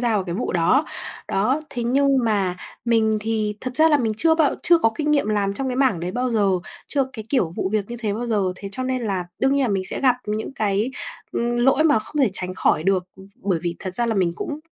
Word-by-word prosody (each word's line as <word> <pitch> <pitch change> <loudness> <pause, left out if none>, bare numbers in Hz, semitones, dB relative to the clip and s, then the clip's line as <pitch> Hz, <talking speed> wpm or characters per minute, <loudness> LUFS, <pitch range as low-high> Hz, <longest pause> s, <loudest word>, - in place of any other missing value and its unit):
gia 240 - +1
vào 195 - 0
cái 170 -2 -4
vụ 225 - -2
đó. 185 - +3 0.4
Đó, 250 +10 +1
thế 245 -3 -3
nhưng 275 +3 +3
mà 200 -5 +1 0.3
mình 220 -2 +2
thì 215 -1 -1
thật 255 0 -1
ra 315 +1 +6
là 300 - +5
mình 230 -5 0
chưa 320 +7 +4
bao 315 -3 +2
chưa 345 -1 +6
có 225 - +3
kinh 300 -1 0
nghiệm 285 -7 +2
làm 200 -2 0
trong 270 +5 -2
cái 250 - -2
mảng 260 -10 +2
đấy 175 +1 -3
bao 250 +4 -1
giờ, 210 -4 +2 0.4
chưa 275 -2 +1
cái 220 -4 -7
kiểu 220 - +1
vụ - - -1
việc 215 -2 +1
như 240 - -4
thế 215 -3 -1
bao 235 +4 -3
giờ. 215 -4 +1
Thế 200 - -7
cho 255 - -3
nên 255 -1 -1
là 195 -5 -1 0.2
đương 270 +1 +3
nhiên 280 - +2
là 255 - +1
mình 195 -2 0
sẽ - - -4
gặp 255 -2 +4
những 215 +5 -3
cái, 210 +2 0 0.4
ừm, 240 0 -1
lỗi 265 +4 +4
mà 295 -6 +5
không 220 +8 -9
thể 245 - +3
tránh 185 -1 -3
khỏi 155 - +2
được. 190 0 +1 0.3
Bởi 190 -4 -1
vì 170 -1 -2
thật 185 -1 -6
ra 235 +4 0
là 225 - 0
mình 180 -4 +1
cũng 300 - -5
225 Hz, 260 wpm, -22 LUFS, 200-265 Hz, 0.4 s, ra